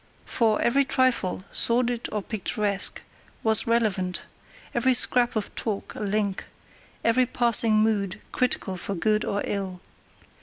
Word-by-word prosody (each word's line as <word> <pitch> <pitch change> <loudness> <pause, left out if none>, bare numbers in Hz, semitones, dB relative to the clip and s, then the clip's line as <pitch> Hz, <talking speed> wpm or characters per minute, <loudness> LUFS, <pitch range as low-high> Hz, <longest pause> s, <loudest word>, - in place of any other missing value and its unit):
For 220 -3 +1
every 275 +4 +3
trifle, 255 -9 0
sordid 240 0 +1
or 210 -2 -3
picturesque, 205 -1 -2 0.4
was 220 0 +3
relevant; 205 -6 0 0.5
every 250 +2 +3
scrap 245 0 +3
of 215 -2 -3
talk 210 -3 -4
a - - -9
link; 205 -1 -2 0.6
every 245 +2 +3
passing 235 -2 +4
mood 200 -4 -1
critical 230 -7 -1
for 195 +2 -4
good 215 +5 +1
or 200 - -2
ill. 190 -3 -4
220 Hz, 125 wpm, -25 LUFS, 200-240 Hz, 0.6 s, passing